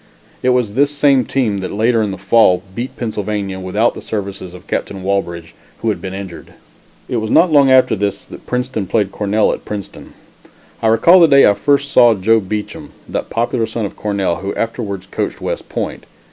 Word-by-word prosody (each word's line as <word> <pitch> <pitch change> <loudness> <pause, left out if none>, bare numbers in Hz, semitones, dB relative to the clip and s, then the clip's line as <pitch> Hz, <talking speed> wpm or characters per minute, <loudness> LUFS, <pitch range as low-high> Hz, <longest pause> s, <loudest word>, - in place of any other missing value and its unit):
It 130 - +1
was 125 -5 +1
this 140 +4 +3
same 140 -3 +2
team 115 -7 -1
that, 95 - -5
later 115 +2 +1
in 105 - -1
the 95 - -5
fall, 95 -1 +3
beat 120 +5 -6
Pennsylvania, 105 -4 -3
without 100 +5 0
the - - -9
services 95 -4 -5
of 90 +2 -13
Captain 95 -2 -4
Walbridge, 85 -4 -2 0.3
who - - +1
had - - -2
been 95 0 -6
injured. 90 -6 -9 0.5
It 125 - -2
was 110 -1 -2
not 170 +7 +4
long 140 -3 +5
after 130 -3 +5
this 100 -1 -3
that - - -13
Princeton 125 -5 -2
played 100 -2 0
Cornell 105 +1 +1
at - - -7
Princeton. 105 -2 -8 0.7
I 115 - +1
recall 115 +12 +6
the 170 - +7
day 140 -2 +6
I 100 - +5
first 140 +5 +1
saw 120 -3 +6
Joe 110 +4 +3
Beacham, 105 +1 -6
that - - -4
popular 115 0 -1
son 110 -1 -3
of - - -7
Cornell, 100 -4 -1
who 100 +1 -5
afterwards 105 -5 -4
coached - - -4
West - - -5
Point. - - -5
105 Hz, 195 wpm, -17 LUFS, 95-125 Hz, 0.7 s, the